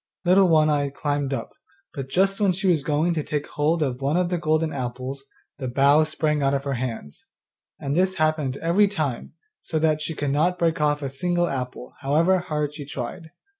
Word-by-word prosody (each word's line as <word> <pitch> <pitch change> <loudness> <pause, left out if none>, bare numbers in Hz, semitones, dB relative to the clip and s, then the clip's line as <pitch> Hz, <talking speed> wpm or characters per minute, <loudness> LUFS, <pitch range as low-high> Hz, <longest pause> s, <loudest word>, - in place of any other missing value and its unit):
Little 185 +1 +5
One 155 -2 +5
eye 145 -2 +1
climbed 145 0 -2
up, 135 - -3 0.4
but 135 -2 -6
just 195 +7 +1
when 195 -3 +3
she 195 +3 -3
was 165 -6 +3
going 155 +4 +1
to 160 - -1
take 150 0 -3
hold 155 +2 +1
of 130 -2 -3
one 140 +5 +1
of 180 -1 +1
the 175 -1 -1
golden 155 0 +1
apples 130 +1 -5 0.3
the 130 - -3
bough 140 +5 +4
sprang 155 -1 -1
out 135 0 +2
of 135 - -2
her 140 -1 -2
hands; 120 - -5 0.5
and 140 +1 -2
this 185 +2 +2
happened 155 -5 0
every 175 +7 +3
time, 155 - -3 0.3
so 160 - -3
that 155 -1 +2
she 155 +1 -3
could 145 -2 -1
not 175 +6 +2
break 165 -3 0
off 145 -1 +1
a 135 - -2
single 175 +5 0
apple, 125 -3 -5
however 160 +7 +2
hard 150 -4 -2
she 150 -1 -7
tried. 150 +4 -6
150 Hz, 205 wpm, -24 LUFS, 140-170 Hz, 0.5 s, Little